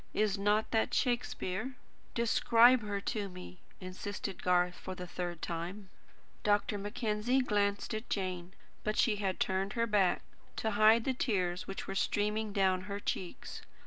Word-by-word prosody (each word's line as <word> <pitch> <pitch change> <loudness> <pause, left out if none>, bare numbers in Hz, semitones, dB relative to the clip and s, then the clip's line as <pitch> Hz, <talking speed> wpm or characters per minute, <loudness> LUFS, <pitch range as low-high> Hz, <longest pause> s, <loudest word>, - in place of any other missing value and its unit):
Is 210 -2 +2
not 210 +2 +1
that 225 -1 +1
Shakespeare?" 245 -2 -1 0.4
"Describe 235 +1 +5
her 205 -1 -3
to 205 -1 -2
me," 180 0 -10 0.2
insisted 190 +1 -5
Garth, 180 0 +3
for 185 +1 -7
the 180 -1 -6
third 175 -1 -5
time. 180 +4 -5 0.5
Dr. 205 0 +1
Mackenzie 215 +4 0
glanced 205 -4 0
at 220 +2 -5
Jane. 185 -1 -3 0.3
But 215 0 -1
she 215 -3 +3
had 195 -2 -2
turned 190 +1 0
her 230 -1 +1
back, 205 -5 +2 0.3
to 220 - -1
hide 215 +2 +5
the 265 - 0
tears 185 -8 -1
which 195 - -5
were 195 - -4
streaming 210 +2 0
down 190 -2 +2
her 200 0 -3
cheeks. 185 -3 -4
205 Hz, 150 wpm, -32 LUFS, 185-220 Hz, 0.5 s, Describe